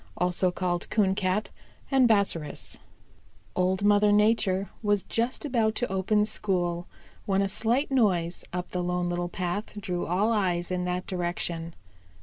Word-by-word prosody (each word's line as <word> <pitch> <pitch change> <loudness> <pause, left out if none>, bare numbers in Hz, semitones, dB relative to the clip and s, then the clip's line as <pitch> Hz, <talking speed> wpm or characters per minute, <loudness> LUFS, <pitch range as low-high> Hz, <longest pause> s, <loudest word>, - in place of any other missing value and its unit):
CHAPTER 180 +1 +2
XXXI 190 +3 0
Bobby 190 +3 0 0.4
Coon 260 -3 +5
Arrives 185 -8 0 0.8
Old 185 +2 +1
Mother 205 0 +5
Nature 205 -2 +2
was 205 -2 +1
just 235 +5 -2
about 225 -5 +1
to 245 - -2
open 210 +2 +2
school 175 -5 -1 0.4
when 195 0 +2
a - - +1
slight 235 +8 0
noise 185 -9 +1
up 180 0 -4
the 180 - -1
Lone 180 0 -1
Little 175 0 -2
Path 190 +4 -4
drew 180 -3 -3
all 200 +6 +2
eyes 180 -4 0
in 180 0 -1
that 180 0 -2
direction. 175 -2 -3
190 Hz, 140 wpm, -27 LUFS, 180-210 Hz, 0.8 s, Coon